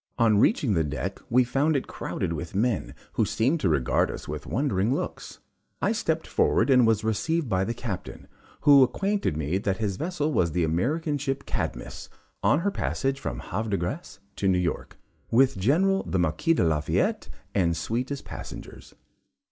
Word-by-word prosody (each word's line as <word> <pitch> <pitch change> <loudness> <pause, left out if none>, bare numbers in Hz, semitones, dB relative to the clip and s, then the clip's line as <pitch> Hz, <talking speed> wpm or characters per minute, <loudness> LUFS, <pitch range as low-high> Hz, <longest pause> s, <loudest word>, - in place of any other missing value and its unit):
On 110 -3 +4
reaching 130 - +3
the 80 -3 +2
deck, 75 +6 -4
we 125 +2 +5
found 140 +5 +1
it 135 - 0
crowded 85 - -4
with 85 +2 -6
men, 105 - 0 0.2
who - - +2
seemed 135 +9 +1
to 95 - +1
regard 70 -6 +2
us - - -7
with 75 0 -6
wondering 115 -5 0
looks. - - -4 0.4
I - - +1
stepped - - -1
forward 120 +5 +2
and 125 -3 +6
was 110 -2 +2
received 150 +8 0
by 95 -3 +1
the 115 - -3
Captain, 105 -7 -6 0.3
who 145 -2 +7
acquainted 195 - +1
me 80 +5 -1
that 100 -2 -1
his 100 -4 -2
vessel 155 - -1
was 85 - +1
the 90 0 +1
American 145 - 0
ship 135 0 -3
Cadmus, - - -4 0.3
on 150 - +3
her 200 +3 0
passage 135 -7 -1
from - - -4
Havre 110 +5 -3
de 100 - +1
grace 110 - -5 0.2
to 100 - 0
New 95 -1 +3
York, 90 -1 -2 0.3
with 130 +3 +4
General 185 - +3
the - - -2
Marquis 90 - +1
de - - +2
Lafayette 75 -3 0 0.2
and 85 -4 +1
suite 115 +10 -2
as 140 -1 -4
passengers. - - -9
115 Hz, 180 wpm, -26 LUFS, 90-140 Hz, 0.4 s, who